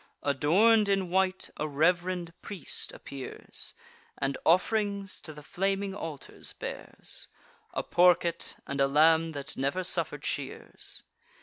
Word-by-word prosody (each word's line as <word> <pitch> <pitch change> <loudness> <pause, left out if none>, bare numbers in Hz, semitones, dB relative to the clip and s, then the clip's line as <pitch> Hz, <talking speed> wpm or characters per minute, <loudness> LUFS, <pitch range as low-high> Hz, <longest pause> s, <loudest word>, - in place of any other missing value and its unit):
Adorn'd 200 - +4
in 195 -3 +1
white, 190 0 +1
a 155 - -1
rev'rend 175 +3 +1
priest 200 -6 -2
appears, 135 -2 -3 0.4
And 135 0 -1
off'rings 200 +2 +2
to 160 - -6
the 150 -1 -11
flaming 195 +4 -1
altars 160 -8 -5
bears; - - -6 0.5
A - - 0
porket, 175 -1 +3
and 140 0 -2
a 135 - +5
lamb 160 +3 +5
that 140 -2 -4
never 140 +8 0
suffer'd 180 - +1
shears. - - -4
175 Hz, 120 wpm, -29 LUFS, 150-190 Hz, 0.5 s, a